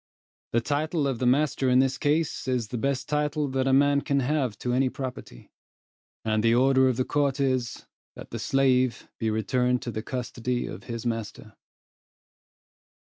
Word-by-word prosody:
The 115 - +3
title 150 +4 -1
of 135 -4 -1
the 125 - +1
master 135 0 +2
in 125 - +4
this 130 0 +2
case 150 0 0
is 125 -4 -1
the 125 - -3
best 135 +1 -1
title 150 0 0
that 130 0 0
a - - +3
man 140 +1 +4
can 140 -1 0
have 130 -4 -1
to 125 - -2
any 130 +1 +2
property; 125 - -8 0.7
and 110 -1 +1
the 115 +1 +3
order 130 +1 +4
of 125 - -1
the 130 - 0
court 145 -1 0
is, 130 -3 -1 0.3
that - - -11
the - - -4
slave 130 -3 +1
be 110 - 0
returned 125 +3 0
to 120 - -4
the 110 - -4
custody 125 0 -3
of - - -8
his 115 -1 -6
master. 115 -2 -4
130 Hz, 175 wpm, -26 LUFS, 120-140 Hz, 0.7 s, in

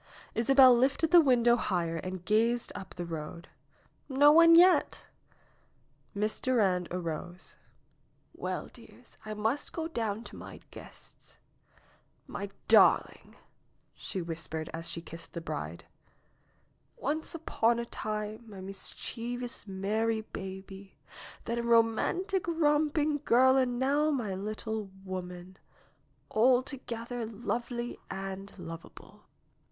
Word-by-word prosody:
Isabel 260 +1 +6
lifted 275 +6 +2
the 350 -1 +9
window 240 -4 +4
higher 170 -7 -1
and 185 +1 -6
gazed 230 +3 +2
up 190 -1 -9
the 175 - -4
road. 165 +1 -7 0.6
"No 285 +2 +6
one 335 +1 +8
yet 360 +2 +5 0.5
!" - - -39
Miss 210 +1 -1
Durand 195 -9 +2
arose. 175 0 -6 0.8
"Well, - - -4
dears, - - -16
I 215 - -4
must 225 +7 -1
go 325 -1 -3
down 225 -7 -3
to - - -11
my - - -10
guests." - - -13 0.9
NAOMI'S - - -13
WEDDING - - -4
BELLS - - -17 0.6
69 - - -19
darling - - -20 0.3
!" - - -42
she 190 - -5
whispered 160 -1 -5
as 165 +1 -5
she 170 - -6
kissed 165 0 -11
the 170 - -4
bride. 80 - -6 1.1
'^Once 310 +4 -2
upon 235 -7 +1
a 235 - -2
time 215 0 -5
my 200 -2 -10
mischievous, 230 +5 -5
merry 215 +4 -1
baby, 190 -1 -9 0.5
then 235 +1 -2
a - - 0
romantic, 235 - +2
romping 300 -2 +1
girl 260 +1 +5
and 255 -2 +1
now 285 +4 +2
my 240 -9 -1
little 215 +1 -4 0.2
woman, 180 0 -7 0.8
alto 255 +4 +3
gether 235 0 -4
lovely 240 +2 -4
and 195 +1 -6
lovable." 165 -2 -11
225 Hz, 125 wpm, -30 LUFS, 190-255 Hz, 1.1 s, the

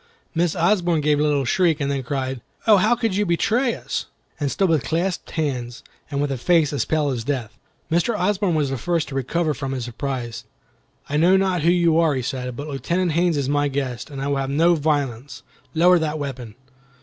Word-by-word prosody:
Miss 170 0 +1
Osborne 175 -2 +2
gave 150 0 +2
a - - +2
little 145 -2 +1
shriek, 165 +3 +2
and 140 -1 -1
then 140 -1 -1
cried. 130 -1 -3 0.2
"Oh, 215 -2 +7
how 215 +6 +3
could 225 -5 -1
you 205 - +2
betray 225 +7 +1
us!" - - -4 0.3
and 145 -2 0
stood 195 +7 +1
with 160 -5 +2
clasped 175 +3 -2
hands, 125 -6 -3 0.3
and 140 -1 -2
with 140 -4 -1
face 165 -3 +3
as 145 - 0
pale 155 -2 +1
as 125 -4 -2
death. 125 -5 -3 0.4
Mr. 175 +7 +1
Osborne 190 -2 +1
was 145 -3 0
the 135 - -3
first 170 -2 -1
to - - -8
recover 155 +4 0
from 135 0 -4
his 125 -3 -3
surprise. 120 -2 -4 0.6
"I 145 - -1
know 180 +5 +5
not 190 -3 +1
who 165 - +3
you 170 -2 +3
are," 160 -4 +3
he 130 - -2
said, 125 -1 -4
"but 145 +4 -6
Lieutenant 170 +6 -1
Haines 170 0 +2
is 140 -2 -1
my 145 +1 +1
guest, 135 -1 -3
and 140 -2 -7
I 135 - -3
will 140 -1 0
have 135 0 -2
no 165 +5 +4
violence. 140 -5 -2 0.3
Lower 175 +2 +5
that 155 -1 -2
weapon!" 130 -7 -6
150 Hz, 210 wpm, -22 LUFS, 135-175 Hz, 0.6 s, Oh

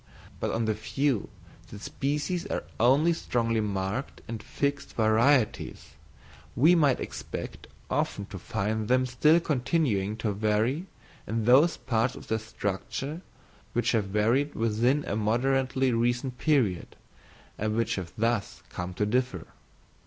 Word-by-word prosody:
But - - -1
on 115 0 0
the 110 - +1
view 120 +2 -1 0.4
that 105 - -9
species 150 - -2
are - - -2 0.2
only 140 +8 +4
strongly 115 -7 0
marked 100 +5 -3
and 115 -1 -5
fixed 140 +4 -2
varieties, 115 +3 +2 0.7
we 155 +9 +6
might 145 -7 +4
expect - - -6 0.2
often 100 - -1
to 95 - -6
find 105 +5 -2
them 130 +1 +3
still 150 +7 +4
continuing 125 - 0
to 110 -1 -1
vary 110 - 0 0.4
in 110 +1 -1
those 140 +8 +5
parts 115 -1 0
of - - -11
their 110 - +1
structure 110 - -4 0.5
which 120 -1 +1
have 110 -4 +1
varied 115 +9 +1
within 115 +6 +1
a 100 - -2
moderately 130 +4 +1
recent 120 +2 0
period, 125 - +1 0.6
and 110 0 -1
which 115 0 +1
have 90 -3 -5
thus 115 -2 -1
come 90 0 -5
to 105 - +1
differ. 115 -6 0
115 Hz, 135 wpm, -28 LUFS, 105-135 Hz, 0.7 s, we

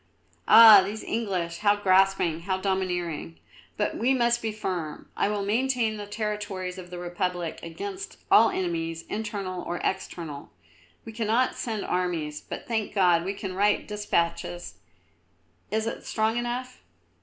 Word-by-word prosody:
"Ah! 220 -3 +10
these 210 +3 -5
English, 185 -7 -2
how 205 -1 +4
grasping, 190 -4 +3
how 185 +2 -2
domineering! 180 - -2 0.4
But - - 0
we 260 +4 +2
must 240 -1 +2
be 225 - -2
firm. 180 -7 -5
I - - +1
will 205 -1 -2
maintain 230 0 +1
the 205 -1 -7
territories 205 -3 -4
of 180 -1 -10
the 180 - -7
Republic 175 -1 -3
against 395 - -7
all 225 0 +7
enemies, 165 -2 -3
internal 200 -4 -4
or 175 0 -4
external. 165 -6 -4 0.6
We 225 - -7
cannot 230 +3 +1
send 220 -4 -4
armies, 165 -5 -2
but, - - -8
thank 220 -3 -2
God, 175 -4 +4
we 195 +3 -3
can 195 -2 -5
write 205 +2 +2
despatches. 175 - -2 0.9
Is 220 +2 0
it 230 - -4
strong 220 0 0
enough?" 245 +1 -3
195 Hz, 145 wpm, -26 LUFS, 175-220 Hz, 0.9 s, Ah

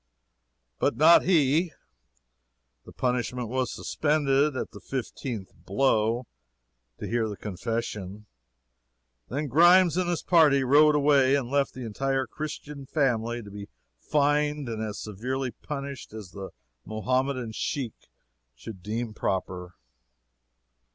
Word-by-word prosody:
But - - +1
not 160 +4 +7
he! 160 -1 +3 1.1
The - - -12
punishment 125 -2 -2
was 130 +1 -1
"suspended," 145 -2 +1
at - - -4
the - - -11
fifteenth 125 -5 -5
blow 115 +1 +1 0.7
to - - -6
hear 115 -1 0
the 105 - -6
confession. 105 0 -4 1.0
Then 145 +4 -2
Grimes 175 +5 +5
and 180 -1 +1
his 175 - -1
party 150 -6 +5
rode 150 +3 +5
away, 140 -2 +4
and 130 -3 -2
left 140 -1 +1
the 130 -2 -6
entire 135 +4 -1
Christian 150 -2 -7
family 120 -5 0
to 100 - -11
be 100 0 -8 0.3
fined 150 - +1
and 110 -2 -4
as 105 -2 -4
severely 125 +5 -3
punished 140 -4 -7
as 105 -5 -9
the 95 -1 -7 0.3
Mohammedan 130 +2 -1
sheik 125 +1 -3 0.6
should 95 - -10
deem 110 +3 -3
proper. 90 -3 -3
130 Hz, 120 wpm, -27 LUFS, 110-145 Hz, 1.1 s, not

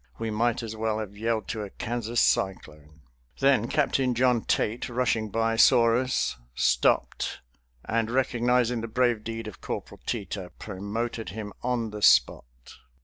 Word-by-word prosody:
We 115 -1 -3
might 115 +2 0
as 110 -1 -5
well 110 0 -1
have 105 -2 -6
yelled 110 0 -1
to 110 - -3
a 105 - -5
Kansas 120 +1 -3
cyclone. 75 -5 -1 0.4
Then 135 -5 +3
Captain 135 -3 +1
John 125 -1 +3
Tait, 115 +4 -1
rushing 115 -3 0
by, 115 +1 0
saw 115 -2 +6
us, 130 - 0 0.2
stopped, 60 -1 +1 0.4
and, 115 0 0
recognizing 125 -1 +1
the 115 - -4
brave 120 -1 +1
deed 115 0 -5
of 105 - -10
Corporal - - -6
Teter, 100 -5 -4
promoted 110 +3 -4
him 105 -1 -7
on 120 -3 -1
the 105 0 -7
spot. - - +5
115 Hz, 145 wpm, -27 LUFS, 105-120 Hz, 0.4 s, saw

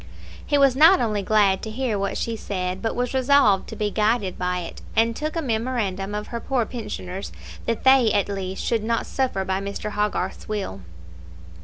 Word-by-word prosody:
He 290 - +1
was 275 -2 +5
not 325 +7 +7
only 215 -3 0
glad 200 -1 +3
to 220 - -5
hear 235 0 -1
what 200 - -2
she 230 - -2
said, 185 -3 -3
but 225 - -2
was 245 +1 -1
resolved 260 -7 +4
to - - -7
be 210 -1 -1
guided 210 -3 +1
by 180 0 -1
it, 170 - -8
and 230 +1 +3
took 305 +4 -3
a 330 - -1
memorandum 220 -5 -2
of 210 0 -5
her 235 - -4
poor 245 0 0
pensioners, 205 -5 -6 0.4
that 230 -1 -1
they, 260 -4 +6
at 205 -2 +1
least, 195 -1 -4
should 230 -3 0
not 230 +1 0
suffer 250 -8 -1
by 190 +1 -1
Mr. 200 +1 -4
Hogarth's 210 0 -2
will. 195 - -3
215 Hz, 190 wpm, -23 LUFS, 195-245 Hz, 0.4 s, not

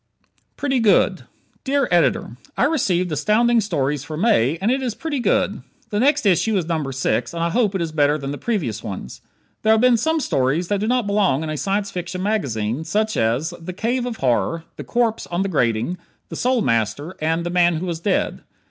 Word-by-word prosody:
"Pretty 270 -3 0
Good" 220 -3 +3 0.4
Dear 275 -1 +1
Editor: 170 -8 +2 0.2
I - - +2
received 190 - +1
Astounding 225 +9 +3
Stories 145 -8 -1
for 155 - -6
May 165 - +2
and 205 +6 +1
it 265 +1 0
is 245 -4 -2
pretty 315 -4 -3
good. 240 - +1 0.3
The 205 - 0
next 275 0 +2
issue 200 +3 +3
is 180 - -1
number 160 -5 -2
six, 135 +5 -1
and 165 - -1
I 170 - 0
hope 215 -2 +1
it 180 - 0
is 165 - -4
better 150 -1 +2
than 140 -2 -5
the 145 - -6
previous 150 - -2
ones. 95 -10 -7 0.4
There 220 - +4
have 220 - +3
been 250 -1 +5
some 320 +8 +1
stories 155 - 0
that 205 -1 +1
do 215 - -1
not 250 -1 +1
belong 200 -8 +1
in 155 - -3
a - - -3
Science 195 +5 -1
Fiction 180 +1 -4
magazine, 135 - -1
such 215 +5 0
as: 120 +10 0
"The 180 +2 -6
Cave 240 +6 -1
of 235 -2 -5
Horror," 135 +6 0
"The - - -7
Corpse 235 -2 0
on 175 +2 -1
the 195 - -2
Grating," 125 +2 0 0.3
"The - - -6
Soul 250 -2 +1
Master," 115 - -1
and 165 +2 0
"The 175 - -2
Man 175 -1 +3
who 165 +4 -3
was 170 -2 -3
Dead." 190 +3 -1
180 Hz, 210 wpm, -21 LUFS, 150-225 Hz, 0.4 s, been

